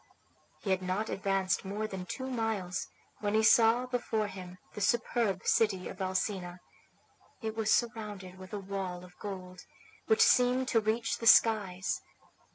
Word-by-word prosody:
He 195 - -1
had 190 0 +1
not 185 +4 -2
advanced 195 -2 0
more 205 +3 -3
than 190 -4 -6
two 260 - -5
miles 225 -8 -2 0.3
when 205 0 -1
he 220 - +3
saw 230 +2 +5
before 235 -4 -1
him 185 -2 -8 0.2
the 210 - -6
superb 230 -5 +1
city 210 -5 +2
of - - -8
Alcina. 185 -1 -2 0.8
It 220 0 -3
was 220 -1 0
surrounded 210 -6 -1
with 185 0 -11
a 205 - -4
wall 190 -2 -5
of 180 0 -17
gold, 185 -3 -7 0.5
which 445 +1 +5
seemed 250 - +4
to 230 - +4
reach 220 +2 -1
the 230 - -1
skies. 190 -6 +4
205 Hz, 155 wpm, -31 LUFS, 185-225 Hz, 0.8 s, saw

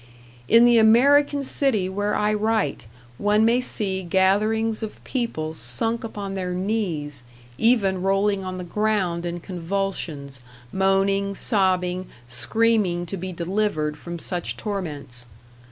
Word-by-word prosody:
In 230 +1 +6
the 240 -1 +6
American 280 +6 +4
city 260 -8 0
where 205 +2 -1
I 210 0 +1
write 215 - -1 0.3
one 210 +1 +3
may 240 +2 +3
see 195 -6 -1
gatherings 210 +5 +2
of 220 -1 -7
people 160 - -3
sunk 160 - -1
upon 205 -3 -5
their 180 -2 -3
knees, 180 - -2 0.4
even 200 -6 +3
rolling 195 +1 +1
on 185 0 -5
the 180 - -5
ground 180 -3 -1
in 175 0 -4
convulsions, 170 -7 -4 0.3
moaning, 195 +1 +1
sobbing, 185 -4 +1 0.2
screaming 175 - +1
to 175 - -5
be 185 0 -5
delivered 170 -3 -1
from 170 +3 -7
such 175 +1 -4
torments. 145 - -5
195 Hz, 125 wpm, -23 LUFS, 175-220 Hz, 0.4 s, In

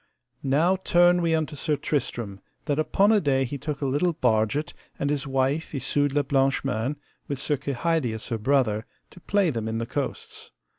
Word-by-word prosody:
Now 155 +8 +2
turn 175 -1 +4
we 165 -1 +2
unto 155 -1 -2
Sir 150 +2 0
Tristram, 120 -9 -3 0.3
that 145 -1 0
upon 195 +6 +3
a 215 -2 +4
day 135 -3 +2
he 140 +3 -5
took 150 -1 -4
a - - 0
little 145 +6 +1
barget, 115 +5 +1 0.2
and 140 - -1
his 145 -1 -2
wife 135 +4 0
Isoud 145 +1 0
la 145 0 +2
Blanche 135 -1 +1
Mains, 115 +7 -1 0.3
with 140 - -3
Sir 150 +3 0
Kehydius 135 -4 -1
her 115 -2 -2
brother, 115 -3 +1 0.2
to - - -14
play 195 -1 +1
them 115 -4 -3
in 110 0 -2
the 115 - -2
coasts. 140 +3 -5
140 Hz, 185 wpm, -25 LUFS, 130-160 Hz, 0.3 s, turn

